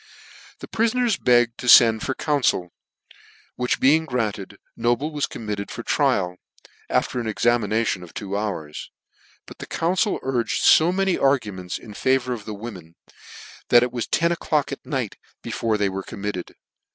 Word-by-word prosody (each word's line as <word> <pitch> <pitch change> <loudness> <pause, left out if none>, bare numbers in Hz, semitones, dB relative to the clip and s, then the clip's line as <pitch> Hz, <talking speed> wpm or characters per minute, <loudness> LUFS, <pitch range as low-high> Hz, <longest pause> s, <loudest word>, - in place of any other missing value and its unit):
The - - -8
prifoners 230 0 +1
begged 120 -1 +3
to 125 - -6
fend 115 -3 +7
for 135 - -2
council; 130 - 0 0.8
which 125 +1 -1
being 155 +4 +4
granted, 105 -7 -3 0.2
Noble 120 +6 0
was 145 -2 -1
committed 105 -2 -5
for - - -7
trial, 90 -1 +1 0.5
after 125 - 0
an 115 - -3
examination 110 -2 +1
of 90 -2 -11
two 100 -1 -4
hours, 95 -8 -4 0.6
but - - -13
the - - -7
council 185 +5 0
urged 125 -3 -1
fo 165 +3 +6
many 195 0 0
arguments 105 -10 0
in 110 - -12
favour 130 +2 +1
of 110 -4 -7
the 110 - -6
women, 95 -7 -9 0.7
that 120 0 +7
it 125 - -1
was 120 -2 -3
ten 170 +1 +1
o'clock 155 -4 0
at 140 - -6
night 130 -8 -3 0.3
be - - -6
fore 110 -2 0
they 105 -1 +1
were 95 0 -3
committed. 100 -1 -6
120 Hz, 160 wpm, -23 LUFS, 100-135 Hz, 0.8 s, fend